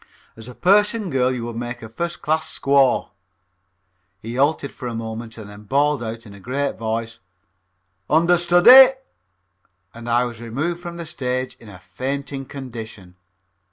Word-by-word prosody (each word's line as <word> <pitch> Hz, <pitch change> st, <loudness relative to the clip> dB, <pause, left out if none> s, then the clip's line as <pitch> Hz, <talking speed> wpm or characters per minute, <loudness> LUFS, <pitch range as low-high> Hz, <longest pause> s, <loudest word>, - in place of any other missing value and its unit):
As 115 Hz, +1 st, -11 dB
a 125 Hz, -, -10 dB
Persian 205 Hz, +1 st, +2 dB
girl 130 Hz, -1 st, +2 dB
you 125 Hz, -2 st, -4 dB
would 120 Hz, -1 st, -6 dB
make 120 Hz, 0 st, -6 dB
a -, -, -7 dB
first 170 Hz, +10 st, -5 dB
class 155 Hz, +1 st, 0 dB
squaw." 140 Hz, -2 st, +3 dB, 1.1 s
He 115 Hz, +2 st, -7 dB
halted 140 Hz, +2 st, +1 dB
for 125 Hz, -, -8 dB
a 120 Hz, -, -4 dB
moment 115 Hz, 0 st, -6 dB
and 110 Hz, -2 st, -9 dB
then 105 Hz, +1 st, -13 dB
bawled 145 Hz, +4 st, +1 dB
out 115 Hz, 0 st, -6 dB
in 100 Hz, -, -12 dB
a 100 Hz, -, -13 dB
great 135 Hz, +6 st, -2 dB
voice, 115 Hz, +1 st, -3 dB, 0.9 s
"Understudy!" 175 Hz, -, +7 dB, 1.0 s
and 115 Hz, +1 st, -8 dB
I 120 Hz, +1 st, +3 dB
was 120 Hz, -2 st, -7 dB
removed 150 Hz, +10 st, -3 dB
from 175 Hz, -1 st, -7 dB
the 170 Hz, -, -6 dB
stage 130 Hz, -3 st, -3 dB
in 115 Hz, -, -14 dB
a 100 Hz, -, -11 dB
fainting 135 Hz, +7 st, -5 dB
condition. 110 Hz, -8 st, -9 dB
125 Hz, 155 wpm, -21 LUFS, 115-150 Hz, 1.1 s, Understudy